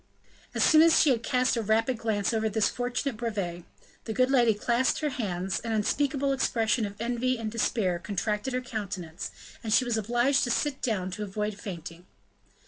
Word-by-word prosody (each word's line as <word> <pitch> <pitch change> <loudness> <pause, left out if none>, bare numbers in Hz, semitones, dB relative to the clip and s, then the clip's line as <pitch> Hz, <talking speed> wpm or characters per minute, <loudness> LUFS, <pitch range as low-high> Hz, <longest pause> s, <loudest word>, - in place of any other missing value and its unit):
As - - +2
soon 310 -1 +7
as 330 0 +6
she 300 - +5
had 235 -3 +1
cast 250 +2 +1
a 230 - 0
rapid 225 +3 +1
glance 220 -1 0
over 220 0 +1
this 215 0 +2
fortunate 245 0 -2
brevet, 195 -7 -3 0.4
the 220 - -3
good 255 +3 +2
lady 240 -5 +4
clasped 240 +7 +1
her 300 -1 0
hands, 190 -6 -2
an 230 -1 -3
unspeakable 275 +5 +1
expression 225 -4 +1
of 200 +1 -11
envy 245 +2 0
and 220 -2 -4
despair 210 -5 0
contracted 210 +6 -2
her 255 - 0
countenance, 200 -8 -5 0.3
and 220 - -3
she 255 +4 +4
was 240 -2 0
obliged 240 +6 +2
to - - -3
sit 280 +3 -1
down 190 -7 -1
to 185 - -6
avoid 210 +1 -3
fainting. 175 -2 -8
225 Hz, 185 wpm, -28 LUFS, 205-250 Hz, 0.4 s, soon